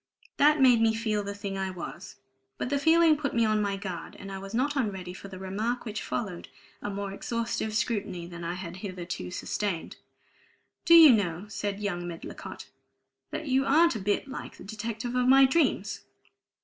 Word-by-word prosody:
That 300 +1 +5
made 250 -4 +6
me 225 -1 +3
feel 220 -2 0
the 200 0 -5
thing 200 -1 -4
I 190 0 -1
was. 180 0 -8 0.4
But 250 - -3
the 285 - +2
feeling 320 +1 +5
put 280 -3 -3
me 230 -1 +4
on 215 -1 +2
my 200 -1 -1
guard. 190 -3 -6
And 195 -1 -9
I 195 - -5
was 195 0 -8
not 265 +6 0
unready 190 -8 -2
for 195 - -10
the 190 -1 -9
remark 210 +7 -3
which 215 -2 -4
followed 185 -7 -4 0.3
a - - -3
more 200 0 -4
exhaustive 230 +1 -3
scrutiny 205 -6 -1
than 170 0 -8
I 170 +1 -3
had 180 -1 -7
hitherto 180 - -5
sustained. 190 - -3 0.9
"Do 335 -1 +8
you 320 -4 +10
know," 190 -5 +1
said 205 -2 -3
young 175 -4 -2
Medlicott, 170 -1 -8 0.6
"that 315 - -5
you 265 0 +3
aren't 315 +2 +4
a - - -2
bit 205 +6 0
like 270 - -8
the - - -11
detective 225 +3 -5
of 250 0 +2
my 270 +1 +8
dreams?" 320 +6 +1
210 Hz, 190 wpm, -28 LUFS, 190-250 Hz, 0.9 s, you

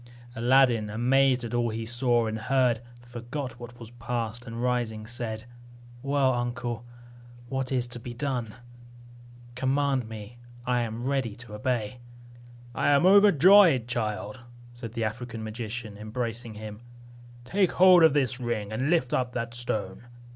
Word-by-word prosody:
Aladdin, 120 -2 +3
amazed 125 +3 +2
at 120 - -5
all 120 -1 +1
he 115 +1 -4
saw 120 0 +1
and 110 0 -3
heard, 125 -1 +2 0.3
forgot 120 +2 -6
what 120 0 -10
was 115 -1 -11
past, 120 0 -4
and 115 0 -6
rising 120 -3 -1
said, 110 -1 -5 0.6
"Well, 140 -1 +2
uncle, 120 -1 -3 0.7
what 135 -1 -2
is 125 -2 +1
to 120 - -8
be 120 +1 -8
done? 120 -4 -3 1.0
Command 130 -1 0
me, 110 +2 -9 0.3
I 125 -1 +1
am 115 0 -4
ready 130 -6 -1
to 120 -2 -12
obey." 120 0 -2 0.7
"I - - +1
am 145 +4 +4
overjoyed, 190 - +6
child," 105 -2 -3 0.3
said 120 -2 -8
the 115 -1 -2
African 115 +1 -4
magician, 110 -1 -6
embracing 115 +1 -4
him, 105 0 -8 0.6
"Take 190 +7 +1
hold 185 -1 +7
of 160 -3 +6
the 130 -3 +1
ring, 115 -4 -3
and 130 +6 -1
lift 160 -8 +1
up 125 -1 0
that 115 -1 -4
stone." 110 -3 -3
120 Hz, 145 wpm, -27 LUFS, 115-130 Hz, 1.0 s, hold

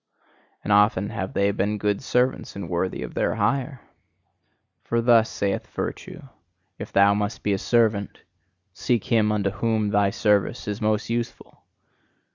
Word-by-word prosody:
And 105 - +1
often 105 -1 +3
have 95 0 -4
they 100 0 +2
been 100 +1 -1
good 105 -1 -1
servants 125 -1 0
and 100 -3 -6
worthy 90 +2 -2
of - - -8
their - - 0
hire. 130 +5 -1 1.0
For 115 - -1
thus 115 -1 +4
saith 100 -1 -2
virtue: - - -6 0.6
"If - - -7
thou 100 +1 +5
must 105 +1 -3
be 105 - +1
a 95 - -1
servant, 110 -4 0 0.5
seek 120 +3 0
him 110 -3 +2
unto 100 -2 0
whom 110 +1 0
thy 100 -1 +3
service 105 +3 0
is 105 +2 -4
most 110 +1 0
useful! 120 0 -5
105 Hz, 150 wpm, -24 LUFS, 100-115 Hz, 1.0 s, thou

